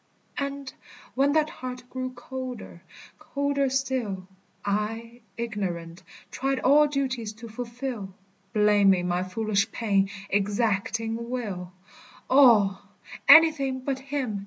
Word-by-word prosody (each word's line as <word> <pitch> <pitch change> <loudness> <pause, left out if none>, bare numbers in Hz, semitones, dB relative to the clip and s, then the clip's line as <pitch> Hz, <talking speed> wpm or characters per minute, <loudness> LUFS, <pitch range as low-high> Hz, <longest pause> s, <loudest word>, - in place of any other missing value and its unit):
And 280 -1 -4 0.4
when 275 +2 +2
that 310 0 +2
heart 250 -1 -7
grew 255 0 -4
colder, 250 -7 -7 0.4
colder 280 -1 -1
still, 250 -8 -2 0.4
I, 225 +4 -3 0.2
ignorant, 185 -7 -4 0.3
tried 270 0 -1
all 295 +3 +5
duties 260 -6 -2
to 230 +2 -10
fulfil, 235 -2 -5 0.4
Blaming 200 -4 +4
my 175 0 0
foolish 200 +2 -1
pain, 200 -4 +1 0.2
exacting 225 +3 0
will, 200 -8 -4 0.6
All, 230 -8 +6 0.5
anything 290 -5 +6
but 265 0 -2
him. 265 -6 -3
235 Hz, 105 wpm, -26 LUFS, 205-265 Hz, 0.6 s, All